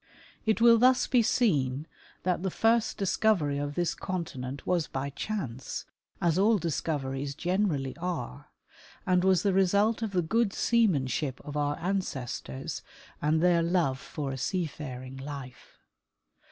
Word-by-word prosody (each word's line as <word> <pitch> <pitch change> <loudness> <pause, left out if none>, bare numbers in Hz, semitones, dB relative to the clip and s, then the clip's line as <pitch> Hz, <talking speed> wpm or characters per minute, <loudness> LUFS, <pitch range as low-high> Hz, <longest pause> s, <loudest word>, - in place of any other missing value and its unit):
It 220 0 +3
will 230 0 +7
thus 255 +1 +5
be 250 -2 +3
seen 150 - +1 0.4
that 180 -1 0
the 190 - 0
first 225 +4 +2
discovery 185 -7 +1
of 145 0 -3
this 175 -1 0
continent 140 -7 -5
was 175 -5 +1
by 135 +2 -3
chance, 140 - -4 0.3
as 170 0 +2
all 215 +3 +5
discoveries 140 -5 -2
generally 175 -7 0
are, 170 - -4 0.6
and 180 -1 +3
was 185 -2 +4
the 200 -2 +2
result 200 +4 +3
of 225 - -1
the 180 -2 +2
good 225 +5 +1
seamanship 150 - +1
of 145 - -8
our 145 0 0
ancestors 150 - -3 0.4
and 155 +1 +2
their 175 -1 +4
love 165 -6 +1
for 140 -2 -5
a 135 - -5
seafaring 135 -5 -4
life. 135 -3 -9
170 Hz, 140 wpm, -29 LUFS, 140-195 Hz, 0.6 s, will